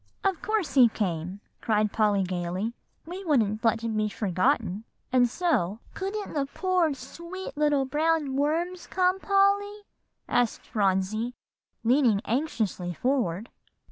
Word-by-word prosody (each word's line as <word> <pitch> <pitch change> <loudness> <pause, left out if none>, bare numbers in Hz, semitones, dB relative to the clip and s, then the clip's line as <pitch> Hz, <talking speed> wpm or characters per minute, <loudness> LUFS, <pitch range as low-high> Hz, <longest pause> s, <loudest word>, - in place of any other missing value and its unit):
"Of 385 -3 0
course 430 -8 -1
he 250 -4 +7
came," 185 -2 -3 0.2
cried 215 -2 +1
Polly 210 -3 +2
gayly; 185 +4 -2 0.3
"we 360 +4 -7
wouldn't 225 - +1
let 225 -1 +2
him 225 -1 -2
be 215 0 +1
forgotten, 190 0 0 0.3
and 245 -1 +4
so" 235 - 0 0.2
"Couldn't 400 +2 -4
the 285 -3 0
poor 370 +2 +1
dear 290 - -2
sweet 340 +9 -8
little 295 -2 +2
brown 300 0 +1
worms 335 +6 -1
come, 370 0 +1
Polly?" 400 +1 +2 0.5
asked 245 -2 0
Phronsie, 210 +4 0 0.5
leaning 240 -3 +4
anxiously 220 - -1
forward. 235 - -1
250 Hz, 130 wpm, -27 LUFS, 210-335 Hz, 0.5 s, he